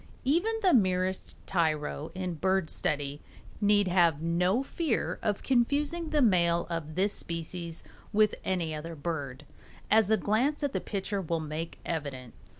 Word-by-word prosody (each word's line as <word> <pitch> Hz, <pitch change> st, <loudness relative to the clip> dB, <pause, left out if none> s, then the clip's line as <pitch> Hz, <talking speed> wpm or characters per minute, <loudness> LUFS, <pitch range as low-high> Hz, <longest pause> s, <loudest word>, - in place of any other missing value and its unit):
Even 345 Hz, +12 st, +2 dB
the 370 Hz, -, +5 dB
merest 185 Hz, -4 st, +1 dB
tyro 155 Hz, -3 st, 0 dB
in 185 Hz, -1 st, -3 dB
bird 190 Hz, +1 st, 0 dB
study 145 Hz, -1 st, -1 dB, 0.4 s
need 205 Hz, -1 st, +4 dB
have 175 Hz, -4 st, +3 dB
no 180 Hz, -, +1 dB
fear 300 Hz, -3 st, -1 dB
of 210 Hz, -3 st, -1 dB
confusing 290 Hz, +6 st, +1 dB
the 300 Hz, -3 st, +3 dB
male 170 Hz, -5 st, +3 dB
of 155 Hz, -2 st, -4 dB
this 200 Hz, +2 st, +2 dB
species 170 Hz, 0 st, -5 dB, 0.3 s
with 215 Hz, 0 st, +4 dB
any 170 Hz, -4 st, -1 dB
other 165 Hz, +2 st, -6 dB
bird, 145 Hz, -3 st, -4 dB, 0.5 s
as 220 Hz, -1 st, +5 dB
a 220 Hz, -, +4 dB
glance 245 Hz, +10 st, +1 dB
at 280 Hz, -1 st, 0 dB
the -, -, -1 dB
picture 200 Hz, 0 st, -3 dB
will 165 Hz, -2 st, -1 dB
make 155 Hz, +1 st, -5 dB
evident. 140 Hz, -7 st, -4 dB
185 Hz, 150 wpm, -29 LUFS, 160-215 Hz, 0.5 s, the